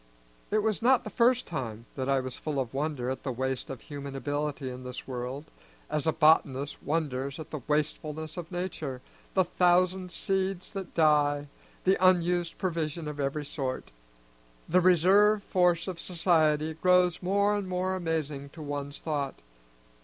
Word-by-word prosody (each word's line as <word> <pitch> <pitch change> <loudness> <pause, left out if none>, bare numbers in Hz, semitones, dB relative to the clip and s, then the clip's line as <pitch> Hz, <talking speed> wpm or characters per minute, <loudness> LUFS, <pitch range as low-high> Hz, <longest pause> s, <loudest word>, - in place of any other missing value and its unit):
It 215 0 +1
was 220 -1 0
not 250 +1 +4
the 215 - -7
first 250 +1 +3
time 115 -8 -5
that 130 0 -2
I 135 -1 +3
was 130 -1 -6
full 150 -3 -3
of 125 -2 -3
wonder 135 -3 -1
at 130 - -4
the 135 - -3
waste 130 +1 -2
of 130 -4 -6
human 140 -2 -7
ability 145 0 -2
in 125 0 -6
this 125 0 -7
world, 130 +4 -5 0.4
as 150 +1 -1
a - - +5
botanist 150 -3 +3
wonders 140 -3 -2
at 160 - -9
the 155 - -4
wastefulness 155 +1 -1
of 175 -1 -7
nature, 165 -7 -4 0.4
the 190 - +5
thousand 180 +1 +2
seeds 190 0 -2
that 195 -3 -6
die, 145 -2 +3 0.3
the 190 0 +2
unused 175 -2 +3
provision 165 -3 -2
of 150 -1 -6
every 145 +2 -1
sort. 135 - -4 0.8
The 180 +2 +4
reserve 195 +4 +5
force 180 -2 +2
of 180 -3 -5
society 160 -3 +2
grows 180 +1 +3
more 200 +3 +2
and 205 -2 -2
more 185 +1 0
amazing 155 -5 -2
to 160 - -10
one's 145 0 -4
thought. 145 -4 -2
155 Hz, 160 wpm, -29 LUFS, 140-180 Hz, 0.8 s, a